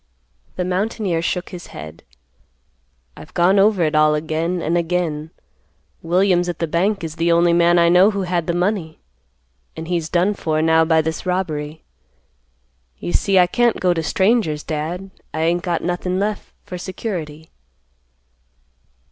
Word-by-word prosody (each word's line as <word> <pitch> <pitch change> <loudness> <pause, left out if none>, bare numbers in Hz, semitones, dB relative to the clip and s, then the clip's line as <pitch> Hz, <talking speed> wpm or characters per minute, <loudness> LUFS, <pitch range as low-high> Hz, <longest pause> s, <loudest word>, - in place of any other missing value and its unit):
The 180 - -2
mountaineer 185 -2 -1
shook 180 +2 -2
his 175 -3 -9
head. 80 0 -10 1.1
"I've - - -14
gone 185 +3 +4
over 200 -3 +3
it 155 -1 0
all 155 0 +4
again 160 +3 -2
an' 165 0 -1
again. 165 -3 -1 0.7
Williams 180 +1 +2
at 175 - -4
the 165 - -1
bank 185 +5 0
is 160 0 -6
the 170 +1 +1
only 170 0 +4
man 170 0 +4
I 170 0 +5
know 180 +4 +6
who 200 -2 -2
had 175 -2 -1
the 170 - 0
money, 175 -3 -1 0.8
an' 160 - -5
he's 165 -2 -2
done 180 +4 +2
for 155 -5 -1
now 160 0 +4
by 160 -1 +3
this 160 +3 -4
robbery. 155 -4 -3 1.1
You 85 +4 -5
see 195 - +2
I 180 - +7
can't 235 +5 +1
go 180 -1 +2
to 165 - -2
strangers, 190 -2 +1
Dad; 170 +5 -4 0.2
I 160 - -1
ain't 170 +2 +1
got 175 -2 -2
nothin' 180 +1 -2
left 205 0 -3
for 180 - -7
security." 165 -5 -6
175 Hz, 155 wpm, -20 LUFS, 160-185 Hz, 1.1 s, I